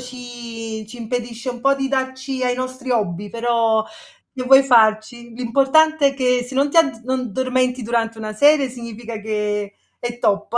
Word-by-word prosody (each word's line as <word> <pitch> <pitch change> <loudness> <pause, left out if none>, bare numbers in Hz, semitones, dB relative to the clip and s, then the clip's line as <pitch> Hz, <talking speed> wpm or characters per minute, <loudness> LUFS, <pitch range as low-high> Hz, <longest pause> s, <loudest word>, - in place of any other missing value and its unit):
ci 235 -3 -8
ci 245 - -10
impedisce 240 +1 -4
un 245 -1 -8
po' 275 +2 +3
di 270 -1 -2
darci 260 0 -3
ai 250 -1 +1
nostri 255 0 -5
hobby, 205 -4 -1
però 230 -1 +1 0.5
che 260 -2 -5
vuoi 270 +1 +7
farci? 235 -1 +2
L'importante 280 +5 +3
è 275 - -5
che 250 -2 +1
se 265 - -9
non 280 +2 +2
ti 330 - +4
add 240 -8 +2
non 255 -2 -2
dormenti 255 +1 0
durante 230 0 -1
una 215 -1 -5
serie 285 +3 +4
significa 235 -2 -8
che 210 -1 -2 0.2
è 240 0 -5
top. 210 0 0
245 Hz, 170 wpm, -20 LUFS, 225-260 Hz, 0.5 s, vuoi